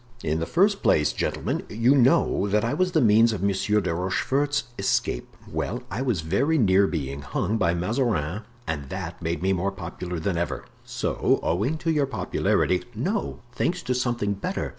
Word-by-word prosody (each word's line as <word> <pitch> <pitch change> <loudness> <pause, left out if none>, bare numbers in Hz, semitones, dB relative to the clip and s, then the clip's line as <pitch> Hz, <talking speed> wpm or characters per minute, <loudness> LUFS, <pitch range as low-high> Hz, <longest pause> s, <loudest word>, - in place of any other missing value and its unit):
"In 80 0 0
the 80 - -2
first 200 +4 +2
place, 75 - +3
gentlemen, - - -2
you 115 +5 +3
know 135 - +3
that 105 +2 +1
I 115 - 0
was 180 +3 0
the 160 - +4
means 115 0 +5
of 95 -3 -4
Monsieur 100 +2 +2
de 85 - -1
Rochefort's 135 +12 0 0.2
escape; 80 -9 -1
well, - - -3
I 110 +7 -2
was 120 -10 0
very 125 - +1
near 100 -5 +4
being 70 -5 -3
hung 100 +11 -1
by 85 -3 +2
Mazarin 100 - -1 0.2
and 70 -6 -4
that 90 -1 -6
made 85 +1 -2
me 95 +1 +2
more 95 +2 0
popular 90 -1 -6
than 85 +1 -1
ever." 70 -7 -3 0.2
"So, - - 0
owing 105 - 0
to 165 +1 -1
your 145 -3 +1
popularity——" 90 -5 0
"No; 195 - -2
thanks 175 +8 -1
to 125 - 0
something 120 -5 0
better. 100 - -3
100 Hz, 180 wpm, -25 LUFS, 85-130 Hz, 0.2 s, means